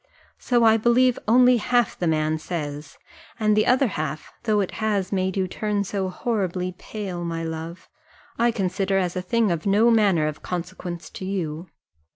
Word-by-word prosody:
So 240 -2 +2
I 225 0 +6
believe 240 +2 +3
only 250 +2 +6
half 240 0 +1
the 175 - -2
man 155 0 +1
says; 150 -3 -5 0.4
and 215 -1 +3
the 215 - +2
other 255 +2 +4
half, 155 - -4
though 215 -2 +2
it 195 - -1
has 205 -4 0
made 190 -1 -1
you 190 -1 +1
turn 205 +2 -1
so 195 -1 -2
horribly 185 -3 -2
pale, 190 -5 -5
my 165 -1 -3
love, 165 +1 -6 0.5
I 235 +1 +2
consider 195 -2 0
as 180 -2 -1
a 185 - -1
thing 220 +2 +1
of 170 +2 -2
no 215 +4 +4
manner 200 -8 +3
of 155 -1 -4
consequence 175 -1 -5
to 185 - -7
you." 175 -3 -3
190 Hz, 175 wpm, -24 LUFS, 170-220 Hz, 0.5 s, I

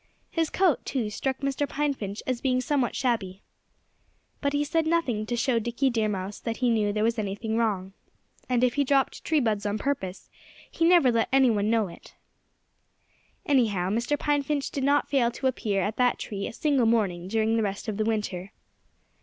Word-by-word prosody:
His 325 -2 0
coat, 365 -5 +2
too, 230 -6 -2
struck 265 +5 -3
Mr. 275 +1 -1
Pine 295 0 0
Finch 205 -5 -6
as 255 -2 -2
being 255 -2 +1
somewhat 255 -1 0
shabby. 215 -7 -1 1.0
But 280 - +1
he 290 0 +1
said 315 +2 0
nothing 255 -11 0
to 240 - -1
show 235 0 +1
Dickie 240 +4 0
Deer 220 -2 0
Mouse 195 0 -4
that 230 -1 -4
he 250 -2 +2
knew 210 -2 +1
there 210 +1 -1
was 230 +1 +1
anything 215 +2 -3
wrong. 200 -5 -1 0.6
And 250 -1 +2
if 250 -1 +3
he 285 - +2
dropped 275 0 +1
tree 315 -2 +2
buds 215 -5 0
on 205 0 -1
purpose, 205 -8 -3 0.4
he 330 - +1
never 335 -7 +6
let 230 -1 +1
anyone 235 -6 +3
know 225 -3 +2
it. 170 - -14 1.3
Anyhow, 210 -10 +2
Mr. 235 +7 0
Pine 290 0 +1
Finch 285 0 -2
did 275 - -3
not 285 +1 +3
fail 255 -4 +2
to 240 +3 -7
appear 210 -6 0
at 210 +3 -3
that 250 -1 +3
tree 200 -2 -4
a - - -7
single 275 -3 +2
morning 195 -6 +1
during 220 +2 +1
the 225 - +2
rest 200 +1 -3
of 210 -2 -3
the 215 - +1
winter. 210 -4 -2
235 Hz, 195 wpm, -26 LUFS, 210-275 Hz, 1.3 s, never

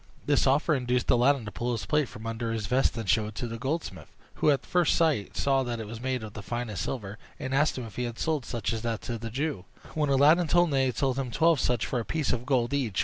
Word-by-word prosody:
This 145 -1 +3
offer 150 +4 +3
induced 125 -3 0
Aladdin 125 0 +3
to 105 - -6
pull 120 +5 -2
his 110 -4 -3
plate 150 +1 +1
from 110 - -10
under 115 0 -3
his 110 -2 -2
vest 125 +2 +1
and 110 -3 -4
show 105 +3 +2
it 110 - -9
to 120 - -3
the 115 0 -6
goldsmith, 150 +6 -3 0.3
who - - +5
at 140 -2 +2
first 175 -3 +2
sight 155 - +1
saw 135 -1 +2
that 120 -2 -3
it 110 - -5
was 110 +2 -8
made 130 -2 -2
of 105 -1 -8
the 105 - -7
finest 120 -2 -4
silver, 105 -4 -5 0.2
and 130 - -4
asked 145 +1 +2
him 125 - -4
if 110 -3 -11
he 125 - -1
had 120 -1 -5
sold 155 -4 -1
such 115 -2 -3
as 110 - -3
that 115 -2 -2
to 120 -2 -4
the 115 +1 -5
Jew; 130 - -3 0.3
when 150 -2 0
Aladdin 150 +5 +5
told 175 +2 +4
him - - -4
that 135 - +2
he 135 - +3
had 125 - -3
sold 135 -1 0
him 130 -2 -2
twelve 160 +5 +3
such, 120 -3 +1
for 125 - -1
a - - -2
piece 155 +4 -1
of 125 +1 -4
gold 125 -2 +1
each. 125 -9 0
125 Hz, 280 wpm, -28 LUFS, 115-140 Hz, 0.3 s, who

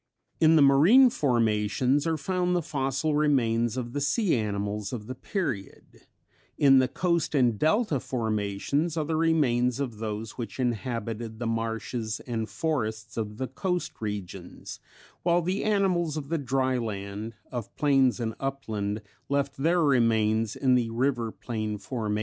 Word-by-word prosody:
In 160 0 +6
the 150 - +6
marine 180 - +6
formations 125 - +1
are 160 -1 +1
found 180 +3 0
the 175 - 0
fossil 135 +1 -1
remains 120 -6 +2
of 120 -1 -4
the 145 - -2
sea 185 - +2
animals 105 -2 -2
of 110 -4 -5
the 130 - -5
period; 130 - -5 0.5
in 135 -2 +6
the 130 - +3
coast 170 +2 0
and 120 -6 +3
delta 160 - +2
formations 115 +8 -1
are 155 - 0
the 160 +1 -1
remains 135 -7 +2
of 120 -6 -4
those 110 +1 -5
which 115 +1 -6
inhabited 115 -2 -3
the 120 - -4
marshes 115 0 -2
and 115 -3 -4
forests 110 -8 -3
of 105 -2 -4
the 130 - -2
coast 180 +2 -2
regions; 105 -4 -6 0.4
while 175 0 +2
the 185 +4 -1
animals 185 -7 +1
of 140 -2 -5
the 165 -1 0
dryland, 115 -6 -2 0.2
of 120 -4 -6
plains 135 -4 +3
and 115 -1 -2
upland, 110 -6 -3 0.3
left 140 0 0
their 165 +5 +2
remains 115 -5 +2
in 130 -2 +2
the 120 -2 +2
river 120 -1 0
plain 110 -3 -4
formations. 105 0 -3
125 Hz, 150 wpm, -27 LUFS, 110-150 Hz, 0.5 s, In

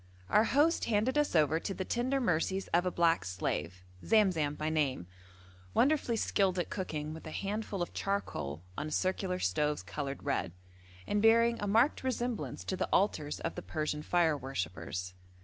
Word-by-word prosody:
Our 215 +1 +5
host 295 +7 +3
handed 225 +4 +1
us 295 -9 +1
over 155 0 +4
to 195 - -4
the 190 - -3
tender 255 +5 0
mercies 190 -3 0
of 175 +2 +2
a - - 0
black 170 - +3
slave, 90 0 -3 0.2
Zamzam 180 -9 +3
by 155 - -3
name, 140 - 0 0.7
wonderfully 270 -3 +3
skilled 195 -4 +1
at 175 - -2
cooking 155 -5 -3
with 160 0 -9
a - - -5
handful 200 +1 -3
of - - -7
charcoal 90 - -3
on 150 +1 -3
circular 185 +3 0
stoves 150 - 0
coloured 140 -2 -5
red, 85 - -1 0.5
and 205 - 0
bearing 230 +1 +5
a 205 - -2
marked 230 +9 +3
resemblance 245 -3 -2
to 190 - -2
the - - -2
altars 150 -7 +1
of - - -2
the 175 - -6
Persian 155 -2 -3
fire 165 -1 +2
worshippers. 90 - -4
180 Hz, 165 wpm, -32 LUFS, 150-215 Hz, 0.7 s, Our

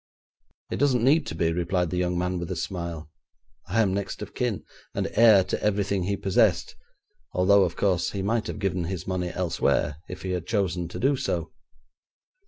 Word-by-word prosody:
'It - - -1
doesn't 130 -5 +2
need 145 +6 +4
to - - -5
be,' 80 0 +1
replied 90 0 0
the 90 - -1
young 90 0 0
man 90 0 -1
with 85 - -5
a - - -2
smile. 85 -4 -5 0.6
'I 105 +5 +2
am 95 -3 0
next 100 0 -3
of - - -10
kin, 120 -6 -2 0.3
and - - 0
heir 110 -4 +7
to 95 - -3
everything 100 -3 0
he 100 +1 -1
possessed, 95 -1 +2 0.6
although, 100 +2 +5
of 85 - -4
course, 95 -3 +1
he 100 -1 -4
might 110 +2 0
have - - -5
given 95 -3 -1
his 90 -1 -4
money 90 -1 -2
elsewhere 85 -4 0
if - - -8
he 95 - -3
had 90 -2 -3
chosen 95 -6 0
to 85 - -7
do 135 +2 +3
so. 90 - -2
95 Hz, 190 wpm, -26 LUFS, 90-100 Hz, 0.6 s, heir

